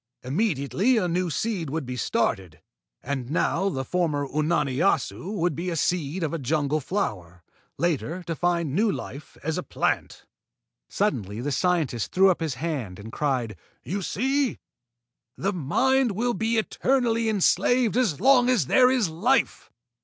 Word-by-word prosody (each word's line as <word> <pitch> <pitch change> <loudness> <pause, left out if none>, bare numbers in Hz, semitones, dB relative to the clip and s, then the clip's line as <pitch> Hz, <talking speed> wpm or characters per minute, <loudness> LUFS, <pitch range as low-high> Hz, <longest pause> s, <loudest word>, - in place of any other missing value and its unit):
Immediately 165 - +1
a 185 -5 +1
new 175 +1 0
seed 180 -1 -2
would 155 0 -3
be 125 0 -5
started. 95 -7 -1 0.4
And 130 -2 -3
now 190 +5 +1
the 135 -6 -3
former 155 -5 0
Unani 150 -2 0
Assu 190 +2 0
would 175 -4 0
be 175 +3 -3
a 170 - -2
seed 165 +1 -1
of 160 - -2
a 165 - -2
jungle 150 +2 0
flower, 90 - -4 0.3
later 170 +1 -1
to 165 -1 -4
find 170 -4 0
new 210 +5 +2
life 145 -4 -8
as 160 +1 -1
a - - -2
plant." - - -2 0.6
Suddenly 100 +1 -1
the 145 +4 -2
scientist 155 - 0
threw 190 +1 +5
up 180 - -2
his 160 -5 -2
hand 130 - -4
and 110 +2 -9
cried: 125 -7 -1 0.3
"You 195 +3 -3
see? 265 +8 0 0.8
The 195 +1 -1
Mind 250 - +2
will 240 +5 0
be 225 +1 0
eternally 230 0 +1
enslaved 220 +4 +2
as 220 - +1
long 255 -1 +5
as 240 - +3
there 250 - +5
is 255 -6 +2
life! 205 +12 0
170 Hz, 155 wpm, -25 LUFS, 140-210 Hz, 0.8 s, threw